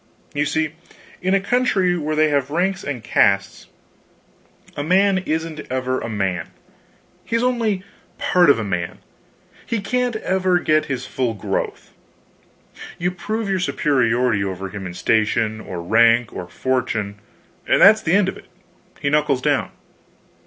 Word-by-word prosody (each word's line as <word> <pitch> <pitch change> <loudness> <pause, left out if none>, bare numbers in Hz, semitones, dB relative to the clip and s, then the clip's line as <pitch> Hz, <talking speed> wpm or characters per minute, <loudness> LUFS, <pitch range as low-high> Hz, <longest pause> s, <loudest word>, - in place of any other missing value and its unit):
You 145 +1 0
see, 155 +1 -1 0.5
in 185 +1 +2
a - - +3
country 195 -5 +1
where 155 -2 -2
they 155 0 +3
have 140 -2 0
ranks 190 +5 0
and 135 -5 -4
castes, 100 -2 +1 1.1
a - - -3
man 190 +4 +3
isn't 160 -2 -3
ever 130 0 -1
a - - -4
man, 95 -6 -2 0.7
he 230 - -3
is 230 - +1
only 230 -6 0 0.3
part 175 -3 +3
of 140 - +6
a 115 - -2
man, 90 -4 -3 0.7
he 230 - -2
can't 245 +4 -1
ever 185 -3 +1
get 155 -3 +2
his 130 -2 -4
full 125 -3 -2
growth. 100 - -4 1.0
You 180 +1 -1
prove 215 +5 -3
your 190 -1 0
superiority 125 - +1
over 95 0 -4
him 95 -1 -6
in 90 - -8
station, 110 +1 +1
or 90 -4 -6
rank, 115 +4 +4
or 90 - -6
fortune, 115 -6 -2 0.5
and - - +3
that's 215 +2 +7
the 160 - 0
end 200 -1 +4
of 190 - -3
it - - -15 0.5
he 140 -1 -1
knuckles 150 -4 +1
down. - - +1
145 Hz, 150 wpm, -21 LUFS, 115-185 Hz, 1.1 s, that's